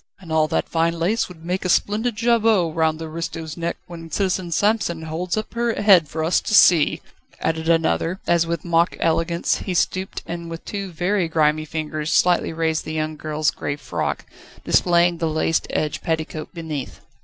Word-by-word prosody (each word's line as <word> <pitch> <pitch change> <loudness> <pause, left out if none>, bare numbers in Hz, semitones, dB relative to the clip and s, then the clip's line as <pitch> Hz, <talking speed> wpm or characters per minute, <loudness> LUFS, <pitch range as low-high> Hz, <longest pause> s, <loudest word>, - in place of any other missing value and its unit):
"And 175 -4 -11
all 155 -1 +3
that - - -1
fine 165 0 0
lace 195 +8 0
would 165 -3 -13
make 180 +2 -2
a 185 - -2
splendid 215 +6 +1
jabot 225 -7 +2
round 160 -1 +1
the 160 - -6
aristo's 160 -1 -5
neck 170 0 -3
when 165 -1 -10
Citizen 185 -1 -1
Samson 205 -3 +1
holds 170 +4 -3
up 215 - -4
her 235 -1 -1
head 190 -6 +6
for 160 +2 -3
us 165 +3 +2
to 210 - 0
see," 170 -6 +5 0.4
added 160 0 -1
another, 165 +2 +1
as 170 -1 +2
with 170 -1 -3
mock 170 0 +2
elegance 165 +1 +1
he 185 - -4
stooped 185 +3 -1
and 170 0 -6
with 165 0 -8
two 200 -2 -5
very 180 +2 0
grimy 155 -1 +1
fingers 155 0 -4
slightly 175 -2 +3
raised 160 -1 -1
the 155 - -6
young 155 0 -2
girl's 155 -1 -1
grey 145 - -4
frock, 145 - -3 0.4
displaying 175 -1 +3
the 165 -1 0
lace 160 +1 +1
edged 155 -1 -2
petticoat 160 -1 -3
beneath. 160 -6 -6
165 Hz, 180 wpm, -22 LUFS, 160-180 Hz, 0.4 s, head